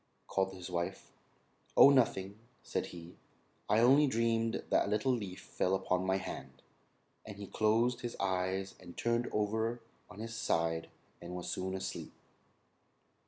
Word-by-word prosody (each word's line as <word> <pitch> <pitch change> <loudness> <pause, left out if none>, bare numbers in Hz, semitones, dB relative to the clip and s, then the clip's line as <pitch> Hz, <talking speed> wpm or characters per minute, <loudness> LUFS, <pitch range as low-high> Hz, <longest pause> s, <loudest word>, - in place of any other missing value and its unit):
called 95 0 0
his 90 0 -8
wife. 90 +2 -3 0.7
"Oh, 140 - +10
nothing," 105 -6 +2 0.2
said - - -2
he; 85 0 -10 0.5
"I 110 - +4
only 140 +5 +6
dreamed 115 -2 +1
that - - +3
a - - -2
little 105 +5 +2
leaf 100 -7 -3
fell 95 +1 -1
on 90 0 +2
my 95 0 +3
hand;" 95 - -7 0.6
and 105 -2 -9
he 100 - -6
closed 115 +5 +2
his 120 -1 -4
eyes, 95 0 -1
and 90 -2 -12
turned 120 +1 +1
over 110 +3 0 0.3
on - - -12
his 115 +1 -6
side 80 -6 0 0.3
and 85 +1 -7
was 90 - -4
soon 95 0 -2
asleep. 95 - -5
100 Hz, 150 wpm, -33 LUFS, 95-115 Hz, 0.7 s, Oh